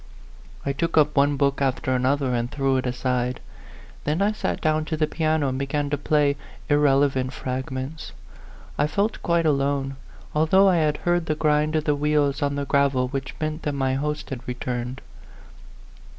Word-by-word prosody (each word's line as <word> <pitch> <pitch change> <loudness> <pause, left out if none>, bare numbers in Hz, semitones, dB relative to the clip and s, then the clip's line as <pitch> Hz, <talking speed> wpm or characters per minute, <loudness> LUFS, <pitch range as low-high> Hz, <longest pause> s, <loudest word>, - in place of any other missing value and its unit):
I 140 - 0
took 165 +4 -1
up 150 -1 +4
one 140 0 +3
book 140 0 +1
after 130 -1 0
another 130 +1 +1
and 120 0 -1
threw 135 -1 +1
it 130 - -1
aside; 125 0 -1 0.6
then 150 +3 0
I 200 +1 +3
sat 215 - -2
down 155 0 +1
to 160 0 -3
the 155 - +2
piano 155 -2 0
and 130 0 -3
began 140 +1 -2
to - - +2
play 145 -1 +2 0.3
irrelevant 140 -3 +3
fragments. 130 +4 -5 0.7
I 145 - +3
felt 200 +7 -1
quite 170 -1 +1
alone, 140 -2 0 0.4
although 160 +6 +4
I 185 -2 +4
had 150 -2 +1
heard 175 -1 +1
the 155 - +1
grind 150 0 +1
of 155 - +1
the 150 - +2
wheels 145 0 +1
on 140 0 0
the 140 0 -2
gravel 135 -2 +2
which 135 0 -4
meant 155 +1 -2
that 150 - -2
my 135 -1 0
host 150 +2 -3
had 130 -3 -4
returned. 125 +1 -4
145 Hz, 175 wpm, -24 LUFS, 135-155 Hz, 0.7 s, up